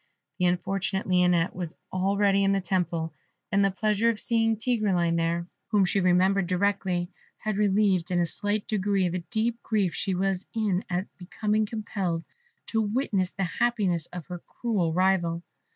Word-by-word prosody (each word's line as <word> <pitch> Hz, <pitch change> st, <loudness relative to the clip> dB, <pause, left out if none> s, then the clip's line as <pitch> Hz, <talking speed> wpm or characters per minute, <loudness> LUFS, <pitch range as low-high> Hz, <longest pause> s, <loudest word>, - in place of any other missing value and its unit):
The 180 Hz, -, +2 dB
unfortunate 190 Hz, +2 st, 0 dB
Lionette 180 Hz, -2 st, +3 dB
was 175 Hz, -1 st, -4 dB, 0.2 s
already 200 Hz, +1 st, +2 dB
in 195 Hz, 0 st, +3 dB
the 195 Hz, -, +2 dB
temple, 170 Hz, -3 st, -1 dB, 0.4 s
and 200 Hz, 0 st, +3 dB
the 195 Hz, -, +4 dB
pleasure 215 Hz, +3 st, +1 dB
of 225 Hz, -2 st, -1 dB
seeing 225 Hz, -1 st, +2 dB
Tigreline 205 Hz, -8 st, +1 dB
there, 170 Hz, +1 st, 0 dB, 0.2 s
whom 205 Hz, -3 st, +3 dB
she 195 Hz, -, +1 dB
remembered 185 Hz, +1 st, +3 dB
directly, 185 Hz, -1 st, 0 dB, 0.3 s
had 215 Hz, -1 st, -2 dB
relieved 200 Hz, -3 st, +2 dB
in 180 Hz, -1 st, +1 dB
a 175 Hz, -, +3 dB
slight 205 Hz, +4 st, -1 dB
degree 195 Hz, -3 st, +1 dB
the 180 Hz, +1 st, -2 dB
deep 230 Hz, +1 st, -1 dB
grief 205 Hz, -6 st, 0 dB
she 190 Hz, -2 st, -1 dB
was 190 Hz, 0 st, -1 dB
in 205 Hz, -4 st, +1 dB
at 180 Hz, +1 st, -1 dB, 0.4 s
being 215 Hz, 0 st, +3 dB
compelled 195 Hz, -6 st, -3 dB, 0.5 s
to 225 Hz, -, +2 dB
witness 205 Hz, -4 st, 0 dB
the 195 Hz, -, -2 dB
happiness 185 Hz, -3 st, 0 dB
of 180 Hz, -3 st, -8 dB
her 180 Hz, -1 st, -6 dB
cruel 200 Hz, -5 st, -1 dB
rival. 175 Hz, -1 st, +1 dB
190 Hz, 160 wpm, -27 LUFS, 180-210 Hz, 0.5 s, the